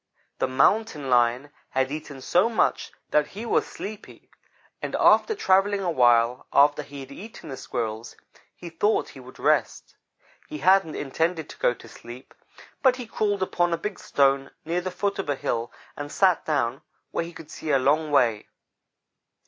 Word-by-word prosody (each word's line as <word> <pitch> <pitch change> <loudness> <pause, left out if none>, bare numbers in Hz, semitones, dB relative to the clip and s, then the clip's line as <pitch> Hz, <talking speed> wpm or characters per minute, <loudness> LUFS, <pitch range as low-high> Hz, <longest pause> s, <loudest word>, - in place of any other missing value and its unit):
"The - - +1
Mountain 145 - +1
lion 125 +3 +2 0.2
had 130 +1 0
eaten 145 -3 -7
so 180 - +2
much 230 - 0 0.2
that 150 -1 +3
he 225 - -5
was - - +1
sleepy 210 +1 -9 0.5
and, - - -3
after 440 - +4
travelling 195 - +2
a 175 - 0
while 120 -3 +3
after 145 +1 +4
he 140 -1 -10
had 135 +1 -11
eaten 200 0 -10
the 135 - -5
Squirrels, 115 -2 -5 0.4
he 170 - -10
thought 205 +6 +1
he - - -13
would - - -13
rest. - - 0 0.5
He 310 - -5
hadn't 190 - +3
intended 160 +3 -2
to - - -11
go 120 - +2
to - - -14
sleep; 120 +2 -12 0.5
but 260 -2 +4
he 250 -1 -7
crawled 205 -3 -1
upon 175 -2 0
a - - 0
big 205 +3 -5
stone 135 -1 +1 0.2
near 170 +3 -1
the 185 - -3
foot 200 +2 -2
of 190 - -3
a 145 - +1
hill 120 -2 -3 0.2
and 145 0 -6
sat 185 -3 +2
down 135 -4 -1 0.3
where - - -1
he 170 - -8
could 160 -2 -12
see 155 - -7
a 140 - +4
long 150 +4 +2
way. 120 -7 +2
150 Hz, 175 wpm, -25 LUFS, 130-190 Hz, 0.5 s, after